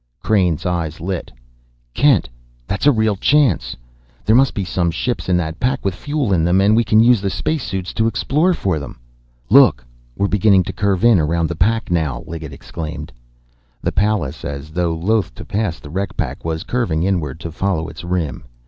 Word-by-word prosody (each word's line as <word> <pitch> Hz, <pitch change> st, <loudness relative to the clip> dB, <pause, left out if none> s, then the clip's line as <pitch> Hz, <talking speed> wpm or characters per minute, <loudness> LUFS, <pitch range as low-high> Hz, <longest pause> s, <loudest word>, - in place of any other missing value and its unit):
Crain's 90 Hz, -6 st, +1 dB
eyes 85 Hz, -3 st, -2 dB
lit. 90 Hz, +1 st, -4 dB, 0.6 s
"Kent, 135 Hz, -, +3 dB, 0.4 s
that's 95 Hz, -, -1 dB
a -, -, +8 dB
real 110 Hz, -4 st, +1 dB
chance! 100 Hz, -, +2 dB, 0.5 s
There 110 Hz, +4 st, +4 dB
must 135 Hz, +2 st, +4 dB
be 100 Hz, -, -2 dB
some 85 Hz, -1 st, 0 dB
ships 120 Hz, +6 st, -2 dB
in 90 Hz, -, +3 dB
that 80 Hz, -2 st, -3 dB
pack 130 Hz, -1 st, -1 dB
with 95 Hz, -, +1 dB
fuel 145 Hz, 0 st, -1 dB
in 85 Hz, -3 st, +2 dB
them, 90 Hz, +3 st, +3 dB
and 100 Hz, +2 st, +4 dB
we 115 Hz, -, +4 dB
can 110 Hz, 0 st, +4 dB
use 120 Hz, -2 st, +5 dB
the 100 Hz, -, -1 dB
space 155 Hz, +8 st, -2 dB
suits 95 Hz, -2 st, -4 dB
to 110 Hz, 0 st, +1 dB
explore 155 Hz, +10 st, +1 dB
for 90 Hz, -, -1 dB
them!" 70 Hz, -, -9 dB, 0.5 s
"Look, 100 Hz, -, +6 dB, 0.3 s
we're 100 Hz, -, +1 dB
beginning 100 Hz, -2 st, +4 dB
to 95 Hz, -, -6 dB
curve 100 Hz, +1 st, 0 dB
in 115 Hz, -6 st, +6 dB
around 80 Hz, +1 st, 0 dB
the 85 Hz, -, -3 dB
pack 110 Hz, +5 st, 0 dB
now!" 80 Hz, -6 st, -1 dB
Liggett 80 Hz, -2 st, -7 dB
exclaimed. 80 Hz, +2 st, -7 dB, 0.7 s
The -, -, 0 dB
Pallas, 100 Hz, -8 st, 0 dB
as 70 Hz, +1 st, -6 dB
though 85 Hz, 0 st, 0 dB
loath 95 Hz, -, 0 dB
to -, -, -9 dB
pass 100 Hz, -5 st, -2 dB
the 75 Hz, -, -11 dB
wreck 95 Hz, +3 st, -3 dB
pack, -, -, -3 dB
was 80 Hz, +1 st, -3 dB
curving 105 Hz, -11 st, -1 dB
inward 85 Hz, -7 st, -1 dB
to 85 Hz, -, -6 dB
follow 85 Hz, -2 st, -1 dB
its 80 Hz, +1 st, -9 dB
rim. 85 Hz, -8 st, -3 dB
95 Hz, 195 wpm, -19 LUFS, 80-110 Hz, 0.7 s, a